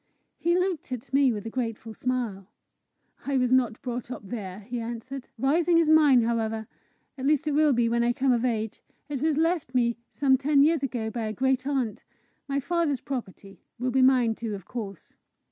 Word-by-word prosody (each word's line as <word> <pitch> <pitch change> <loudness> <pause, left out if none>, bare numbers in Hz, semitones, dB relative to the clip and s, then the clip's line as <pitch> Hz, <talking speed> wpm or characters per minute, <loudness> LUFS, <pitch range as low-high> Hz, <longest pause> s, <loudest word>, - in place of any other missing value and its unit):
He 345 +1 +2
looked 365 -7 -1
at 250 0 -6
me 275 -2 +5
with 210 -2 -5
a 225 - -5
grateful 225 -2 -4
smile. 230 -6 -3 0.8
"I 280 -1 +1
was 250 -1 +1
not 245 -3 +2
brought 245 -1 -4
up 235 -5 -7
there," 195 -3 -6
he 240 +4 -5
answered. 240 +3 -6
"Rising 330 +7 +3
is 330 -2 +3
mine, 295 -6 +6
however 225 -1 -1 0.5
at 260 - -1
least 305 +1 +2
it - - +2
will 300 0 +4
be 240 -2 +2
when 235 +1 +1
I 240 - +3
come 265 +1 +1
of 240 -1 +1
age; 220 -4 -2 0.3
it 280 -3 -3
was 310 -1 +1
left 325 -5 0
me 235 -2 +2
some 270 -2 +3
ten 280 0 +4
years 315 0 +3
ago 235 -5 -2
by 225 -1 -3
a 215 - -3
great 265 +2 0
aunt 255 -7 -1 0.4
My 280 0 0
father's 295 -1 0
property 195 -7 -7 0.2
will 250 +1 -1
be 260 +1 +3
mine 255 -3 +4
too, 220 -2 -4
of 195 -3 -10
course. 200 -7 -7
250 Hz, 195 wpm, -27 LUFS, 225-280 Hz, 0.8 s, mine